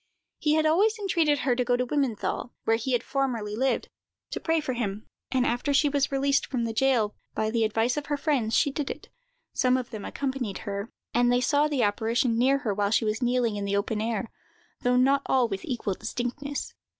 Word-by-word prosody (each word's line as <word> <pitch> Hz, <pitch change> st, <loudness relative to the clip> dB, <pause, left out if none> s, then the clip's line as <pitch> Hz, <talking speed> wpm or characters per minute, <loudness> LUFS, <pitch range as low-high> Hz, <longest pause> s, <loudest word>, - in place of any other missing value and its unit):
He 300 Hz, -1 st, +2 dB
had 315 Hz, 0 st, +2 dB
always 405 Hz, +8 st, +3 dB
entreated 335 Hz, -8 st, +1 dB
her 255 Hz, -3 st, +2 dB
to 250 Hz, -, +1 dB
go 245 Hz, 0 st, +2 dB
to 250 Hz, -, 0 dB
Wimmenthal, 250 Hz, -4 st, -1 dB
where 225 Hz, -, +3 dB
he 250 Hz, +3 st, -2 dB
had 240 Hz, -1 st, +1 dB
formerly 245 Hz, -7 st, -1 dB
lived, 260 Hz, +3 st, 0 dB, 0.4 s
to -, -, -3 dB
pray 325 Hz, 0 st, +1 dB
for 295 Hz, -4 st, -2 dB
him; 215 Hz, -3 st, -3 dB, 0.2 s
and, 255 Hz, -2 st, +1 dB
after 255 Hz, +4 st, 0 dB
she 290 Hz, +1 st, +4 dB
was 280 Hz, -1 st, +1 dB
released 275 Hz, +1 st, +2 dB
from 250 Hz, -3 st, -2 dB
the 230 Hz, -1 st, -2 dB
jail, 230 Hz, -3 st, +2 dB, 0.2 s
by 220 Hz, 0 st, 0 dB
the 230 Hz, -1 st, +1 dB
advice 225 Hz, +4 st, +1 dB
of 290 Hz, -1 st, -3 dB
her 290 Hz, -1 st, 0 dB
friends, 270 Hz, -7 st, 0 dB
she 285 Hz, -, +3 dB
did 285 Hz, 0 st, -3 dB
it. -, -, -7 dB, 0.4 s
Some 255 Hz, -1 st, +3 dB
of 255 Hz, -2 st, -5 dB
them 215 Hz, -2 st, -6 dB
accompanied 260 Hz, -7 st, -3 dB
her, 200 Hz, +1 st, -4 dB, 0.2 s
and 245 Hz, 0 st, +3 dB
they 245 Hz, -, +3 dB
saw 285 Hz, +4 st, +3 dB
the 285 Hz, -5 st, 0 dB
apparition 225 Hz, +3 st, +1 dB
near 270 Hz, +3 st, +4 dB
her 210 Hz, -, +1 dB
while 200 Hz, 0 st, 0 dB
she 225 Hz, -, +2 dB
was 215 Hz, +3 st, -1 dB
kneeling 245 Hz, -3 st, +1 dB
in 200 Hz, -, -3 dB
the 200 Hz, 0 st, 0 dB
open 210 Hz, +1 st, -1 dB
air, 225 Hz, -1 st, -2 dB, 0.5 s
though 250 Hz, 0 st, +2 dB
not 275 Hz, +2 st, +4 dB
all 255 Hz, -2 st, +3 dB
with 195 Hz, -3 st, -4 dB
equal 235 Hz, -6 st, -2 dB
distinctness. 245 Hz, +7 st, -4 dB
250 Hz, 215 wpm, -27 LUFS, 225-275 Hz, 0.5 s, she